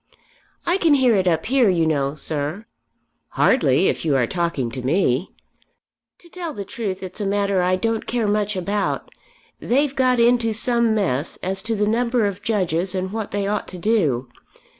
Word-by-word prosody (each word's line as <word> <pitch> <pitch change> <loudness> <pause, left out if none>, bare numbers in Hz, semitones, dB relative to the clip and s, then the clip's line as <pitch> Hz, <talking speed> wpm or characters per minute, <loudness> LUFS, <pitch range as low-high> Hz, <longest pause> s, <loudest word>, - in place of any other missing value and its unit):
"I 350 +2 +2
can 330 -6 +4
hear 255 -4 +4
it 190 -2 +1
up 165 -2 +1
here, 255 -3 +3
you 170 -3 +2
know, 140 -2 0
sir." 155 +7 -4 0.7
"Hardly 185 - +3
if - - -1
you 155 -4 +1
are 125 -3 +3
talking 170 -6 -2
to 130 - -5
me." 135 +2 +1 0.9
"To 345 - -19
tell 340 -4 -6
the 200 - -5
truth 195 -5 -5
it's 185 +3 -6
a - - -1
matter 200 -1 +1
I 180 +1 +2
don't 225 +3 -2
care 235 -3 0
much 210 0 0
about. 200 +2 -2 0.5
They've 280 +2 +1
got 255 -2 +2
into 235 -1 +3
some 235 0 +2
mess 160 -8 -1
as 190 +1 -1
to 225 +2 -2
the 210 0 +1
number 235 +1 +1
of 200 -1 -3
Judges 185 -4 0
and 185 0 -2
what 220 -1 -4
they 205 -1 -2
ought 205 +1 -2
to 185 - -8
do. 170 - +1
200 Hz, 180 wpm, -21 LUFS, 175-230 Hz, 0.9 s, can